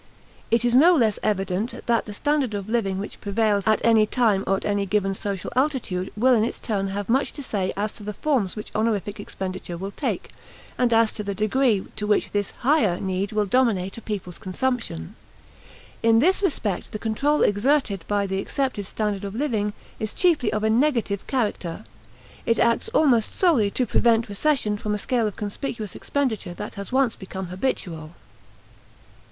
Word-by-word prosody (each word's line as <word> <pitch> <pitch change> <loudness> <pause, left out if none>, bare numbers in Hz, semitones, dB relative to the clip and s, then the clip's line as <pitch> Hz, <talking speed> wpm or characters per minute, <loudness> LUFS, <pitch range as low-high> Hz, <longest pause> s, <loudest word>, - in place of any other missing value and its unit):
It 230 +1 +2
is 240 - +2
no 330 +8 +7
less 225 -8 +2
evident 195 +2 -1
that 235 -1 +2
the 210 - -6
standard 285 -2 0
of 200 -1 -4
living 215 -4 0
which 200 +2 -6
prevails 205 0 +1
at 215 - +3
any 220 -2 +5
time 215 -5 +2
or 195 - +3
at - - -6
any 200 -1 0
given 195 0 +1
social 195 -2 -4
altitude 255 -10 0
will 255 +4 +5
in 220 -3 +4
its 230 - -2
turn 200 -4 -1
have 200 0 -4
much 260 +4 +1
to 285 - -7
say 195 -6 -1
as 210 +1 -1
to 210 - -10
the 210 0 -5
forms 250 -10 0
which 210 - -7
honorific 215 -2 -1
expenditure 185 -3 -5
will 195 +3 -5
take, - - -3 0.4
and 245 -1 +1
as 225 -1 +4
to 210 - -4
the 200 -1 -3
degree 215 0 +2
to 210 - -2
which 210 - +1
this 205 -1 0
"higher" 235 - +3
need 190 +1 -2
will 210 -1 +1
dominate 205 -5 +1
a 230 - -8
people's 195 -5 -5
consumption. 195 - -3 0.9
In 225 0 +5
this 365 +11 +3
respect 225 - -1
the - - -2
control 275 +8 +1
exerted 205 - +2
by 205 -1 +1
the 190 0 -2
accepted 260 -4 -2
standard 210 -2 -2
of 200 +1 -5
living 225 -6 0 0.3
is 215 -1 -4
chiefly 315 -11 +3
of 215 - -1
a 220 - +3
negative 235 -5 +1
character; 210 -7 -2 0.6
it 230 - +3
acts 235 - +2
almost 270 - +3
solely 295 - +3
to 250 +5 0
prevent 230 0 +2
recession 210 -2 0
from 210 0 -1
a - - -1
scale 235 +1 0
of 210 - -5
conspicuous 210 0 -5
expenditure 225 -11 -2
that 210 +3 -6
has 200 -1 -7
once 260 -3 +2
become 190 0 -6
habitual. 175 -6 -3
215 Hz, 180 wpm, -24 LUFS, 200-245 Hz, 0.9 s, no